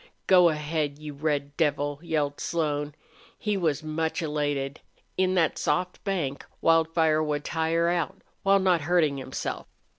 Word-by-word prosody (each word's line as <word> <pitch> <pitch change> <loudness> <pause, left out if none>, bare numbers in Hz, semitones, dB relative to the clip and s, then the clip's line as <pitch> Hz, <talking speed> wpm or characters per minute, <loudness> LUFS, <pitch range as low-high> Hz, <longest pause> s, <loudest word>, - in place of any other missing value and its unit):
"Go 180 -2 +6
ahead, 150 -1 -2
you 150 -1 -7
red 145 -1 -2
devil!" 145 -2 0
yelled 150 -4 -1
Slone. 150 -3 -1 0.4
He 210 -1 -1
was 160 -5 0
much 160 +2 -2
elated. 145 -2 -2 0.4
In 185 0 +2
that 165 -3 +2
soft 180 0 -1
bank 165 -9 -2 0.2
Wildfire 160 -1 +3
would 150 -1 -2
tire 165 +1 +1
out 175 +2 -1 0.2
while 195 0 +4
not 185 -4 +3
hurting 155 -3 +2
himself. 130 - -5
155 Hz, 140 wpm, -27 LUFS, 145-170 Hz, 0.4 s, Go